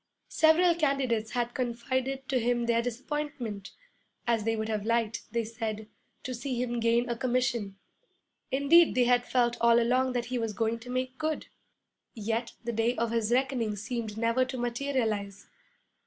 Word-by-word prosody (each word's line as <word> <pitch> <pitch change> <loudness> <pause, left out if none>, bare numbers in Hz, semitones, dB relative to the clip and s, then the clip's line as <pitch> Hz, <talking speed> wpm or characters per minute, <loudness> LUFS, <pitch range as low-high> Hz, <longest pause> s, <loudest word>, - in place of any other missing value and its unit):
Several 330 +2 +5
candidates 275 -8 0
had 240 -1 -1
confided 260 +2 -2
to 260 - +1
him 240 0 +1
their 235 0 +2
disappointment, 245 -4 -4 0.6
as 230 -3 +1
they 225 0 +1
would 220 0 -2
have 215 -2 -2
liked, 230 0 -1
they 235 +1 0
said, 220 -1 -4 0.4
to 255 - -4
see 245 +1 -3
him 240 -1 -1
gain 235 +1 +2
a 240 - -1
commission. 240 -5 -1 0.7
Indeed 295 +5 +5
they 250 - +4
had 245 0 +3
felt 240 -1 +2
all 235 0 +6
along 255 +2 +2
that 245 -1 -1
he 250 +1 -2
was 225 -2 -2
going 225 +1 -1
to 240 +2 -11
make 255 +1 -3
good. 310 0 -2 0.7
Yet 225 +2 -2
the 235 0 -3
day 230 +2 +1
of 230 -1 -1
his 230 -1 0
reckoning 250 -4 +1
seemed 220 +1 -4
never 230 +3 +2
to 255 0 -5
materialize. 235 -5 -2
240 Hz, 165 wpm, -29 LUFS, 225-255 Hz, 0.7 s, all